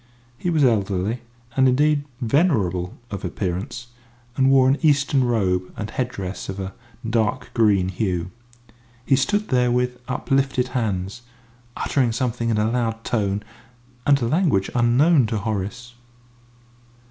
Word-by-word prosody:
He 175 - -3
was 160 -4 +2
elderly, 105 -1 +1 0.3
and, 130 -1 +4
indeed, 145 +2 +2
venerable 110 - +1
of 100 -2 -5
appearance, 100 +6 -4 0.5
and 135 0 +3
wore 135 -1 +5
an 135 +2 +2
Eastern 140 -3 +3
robe 95 -7 0
and 105 +1 -5
head 125 0 -1
dress 95 -5 -6
of 95 +1 -5
a 95 0 -5 0.3
dark 115 +2 0
green 100 -5 +3
hue. 90 -2 -2 0.7
He 135 - +4
stood 205 +9 0
there 125 -2 +2
with 125 0 -1
uplifted 130 -1 0
hands, 105 -3 -2 0.6
uttering 125 -5 +1
something 120 -1 -1
in 110 - +1
a 110 +1 +1
loud 115 -2 -1
tone 100 -3 -1 0.6
and 140 -1 +5
a - - +1
language 125 - +1
unknown 125 +4 +4
to 110 0 -2
Horace. 110 +3 -4
120 Hz, 135 wpm, -22 LUFS, 100-130 Hz, 0.7 s, wore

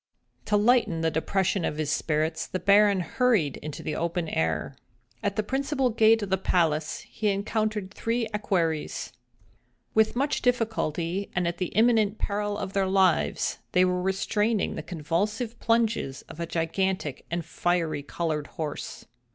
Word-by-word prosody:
To 210 - +2
lighten 210 -6 +3
the 165 0 +1
depression 190 +3 0
of 150 - -2
his 155 -2 -1
spirits, 155 +1 0
the - - -3
Baron 200 +1 +4
hurried 200 - +1
into 150 -1 -7
the 155 - -2
open 170 0 -2
air. 80 - -1 0.5
At 205 -2 -1
the 215 - 0
principal 270 +2 0
gate 225 0 +4
of 195 - -5
the 190 - +2
palace 160 -5 +1
he 215 - -4
encountered 210 0 -1
three 230 +2 -1
equerries. 170 -10 -1 0.8
With 220 +1 +3
much 280 +4 0
difficulty, 200 -7 0
and 180 -1 +1
at 170 - -3
the 180 - 0
imminent 220 -2 +3
peril 205 0 -2
of 195 - -5
their 195 -1 +1
lives, 190 -2 +2
they 180 0 +5
were 180 0 0
restraining 210 +3 0
the - - -4
convulsive 205 +8 -2
plunges 230 - 0
of 160 - -12
a 170 - -2
gigantic 165 -3 -2
and 170 -1 -2
fiery 165 -3 0
colored 150 0 -3
horse. 155 -3 -6
190 Hz, 150 wpm, -27 LUFS, 165-215 Hz, 0.8 s, they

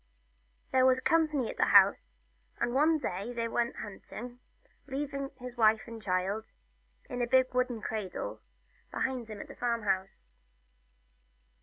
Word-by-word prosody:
There 260 -1 +4
was 255 0 +5
company 305 -4 +2
at - - -12
the - - +4
house, - - +5 0.4
and 240 - 0
one 310 +4 +4
day 200 -4 -4
they 230 -1 -1
went 235 +1 -1
hunting, 240 +4 -8 0.5
leaving 275 0 -3
his 250 -2 -8
wife 220 -1 +4
and 230 -1 -9
the - - -19
child, 190 +4 -1 0.6
in 250 -2 -4
a 240 - +1
big 260 +1 +3
wooden 250 -3 0
cradle, 220 - -4 0.5
behind 255 -3 -2
him 215 -2 -8
at - - -7
the - - -10
farm 235 -2 -1
house. 185 - -2
240 Hz, 150 wpm, -31 LUFS, 220-260 Hz, 0.6 s, was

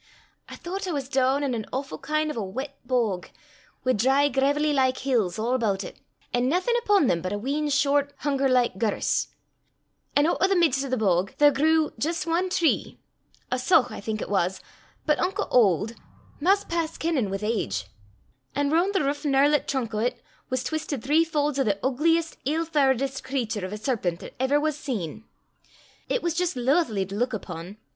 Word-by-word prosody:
I - - -8
thoucht 380 +3 -5
I - - -1
was 280 -4 -3
doon 265 +1 +2
in 270 -3 0
an 220 -3 -4
awfu' 270 +1 -4
kin' 305 0 -1
o' 230 - -2
a - - -2
weet 260 +9 -5
bog, 235 -7 0 0.6
wi' 255 - +2
dry 270 +6 +3
graivelly 285 +3 +1
like 260 -2 +2
hills 230 -9 0
a' 215 - -2
aboot 225 -5 0
it, - - -10 0.3
an' 245 +1 +2
naething 370 - +1
upo' 410 -7 +3
them 170 -8 +1
but 185 - -3
a 205 - -1
wheen 285 +7 -1
short 285 0 +2
hunger 275 -2 0
like 245 -6 +2
gerse. 215 -1 0 0.9
An' 290 - +5
oot 340 - +1
o' 380 - +5
the 390 - +2
mids 300 -7 +3
o' 275 - -5
the 255 - 0
bog 190 -3 +1
there 290 0 +6
grew 315 +2 +2
jist 320 +3 -1
ae 345 +3 +1
tree 345 -3 0 0.5
a 255 - 0
saugh, 255 -2 +3
I - - -7
think 215 +1 -3
it - - -8
was, 190 -1 +1 0.5
but 300 -1 +2
unco 380 - 0
auld 215 -2 +3 0.5
'maist 390 +6 +2
past 330 -1 -2
kennin' 305 -11 0
wi' 195 - -2
age; 110 - -1 0.7
an' 285 +1 +1
roon' 350 +5 +2
the 385 - +1
rouch 285 +1 -1
gnerlet 285 +1 +3
trunk 250 -5 -2
o' 220 +3 +1
't - - -19 0.3
was 255 -1 -1
twistit 295 -3 -3
three 300 +5 +4
faulds 295 -3 -1
o' - - +4
the 205 -4 +1
oogliest, 325 +5 +1
ill 315 +4 0
fauredest 270 -3 +1
cratur 240 -7 -2
o' 185 - -6
a 210 - -4
serpent 210 -7 -2
'at - - -9
ever 265 +3 +2
was 305 0 0
seen. 225 - -5 0.8
It - - 0
was 340 -2 0
jist 350 -1 -1
laithly 250 - +1
to 195 - -8
luik 240 +3 -1
upo'. 175 -1 -7
270 Hz, 195 wpm, -25 LUFS, 225-305 Hz, 0.9 s, there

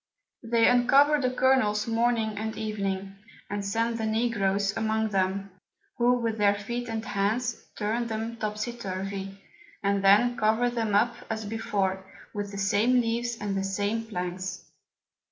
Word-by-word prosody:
They 230 -1 +3
uncover 275 +4 +5
the 255 - +2
Kernels 250 -5 +2
Morning 230 -1 +1
and 220 +1 -4
Evening, 195 -3 -3 0.3
and 205 0 -2
send 230 +3 -1
the 220 - -1
Negroes 205 -3 +1
among 220 0 0
them; 195 0 -1 0.5
who 240 +1 +4
with 230 -3 -1
their 205 0 +4
Feet 240 +4 -4
and 225 0 -3
Hands, 220 +4 -1
turn 225 +3 -1
them 225 +1 -4
topsy 215 +2 -3
turvy, 195 -2 -5 0.5
and 200 0 +1
then 225 +5 +5
cover 220 +3 +2
them 225 -4 -1
up 235 +4 +3 0.2
as 220 -1 -3
before, 200 -3 -1 0.3
with 205 -1 -3
the 200 - -7
same 210 +5 +3
Leaves 235 0 -1
and 205 -1 -2
the 195 - -1
same 205 +3 -1
Planks. 185 -2 -4
220 Hz, 150 wpm, -27 LUFS, 200-235 Hz, 0.5 s, uncover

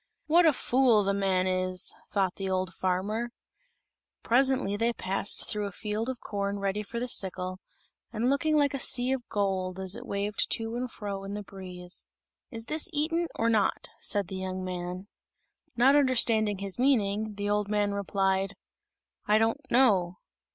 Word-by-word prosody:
"What 335 +2 +5
a 310 - +5
fool 245 -4 +3
the 200 0 +1
man 190 -2 +1
is!" 185 0 0 0.2
thought 190 -3 +1
the 195 -1 -4
old 185 -1 -1
farmer. 195 +7 -1 0.9
Presently 260 -4 +2
they 230 +3 +1
passed 195 -1 -1
through 210 -1 -1
a - - -6
field 215 +4 -3
of 260 -2 -4
corn 200 -1 -3
ready 200 +1 -1
for 230 +3 -5
the 250 - -2
sickle, 185 -4 -2 0.5
and 230 +1 -1
looking 305 +3 +2
like 285 -2 +3
a 275 - -2
sea 245 +1 +2
of 260 -2 -3
gold 190 -3 -1
as 190 +1 -2
it 245 +2 -8
waved 200 +1 0
to 225 0 0
and 250 +1 -2
fro 200 -3 -5
in 200 +1 -5
the 210 - -5
breeze. 180 -2 -8 0.4
"Is 225 -3 -6
this 310 +7 -2
eaten 330 +3 0
or 230 - +1
not?" 220 -4 +1
said 200 -3 0
the 190 - -5
young 185 0 -4
man. 180 +1 -5 0.7
Not 265 +4 +5
understanding 230 -7 +3
his 195 +2 -4
meaning, 215 -5 +2
the 205 0 -2
old 205 -1 0
man 205 -1 +1
replied, 195 -1 0 0.7
"I 210 - +5
don't 225 +1 +1
know." 195 -9 +3
205 Hz, 170 wpm, -28 LUFS, 190-240 Hz, 0.9 s, What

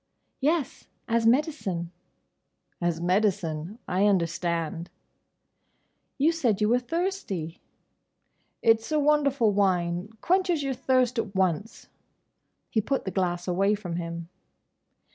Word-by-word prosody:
"Yes. 300 0 -1 0.2
As 230 -1 +2
medicine." 230 - 0 0.9
"As 170 -1 0
medicine—I 180 +1 0
understand." 170 -2 -1 1.3
"You 300 +4 +4
said 250 -12 0
you 210 0 +2
were 245 +2 +4
thirsty." 250 - -3 1.0
"It's 225 +3 +3
a 305 - +3
wonderful 280 -6 +3
wine. 180 -2 +1
Quenches 355 - +1
your 275 -1 -1
thirst 255 -1 +1
at 210 -3 -4
once." 190 +3 -1 0.9
He 220 - +2
put 270 +6 -1
the 190 - -2
glass 175 -2 -1
away 195 +3 +2
from 180 -5 -5
him. 170 -1 -5
205 Hz, 105 wpm, -27 LUFS, 175-260 Hz, 1.3 s, You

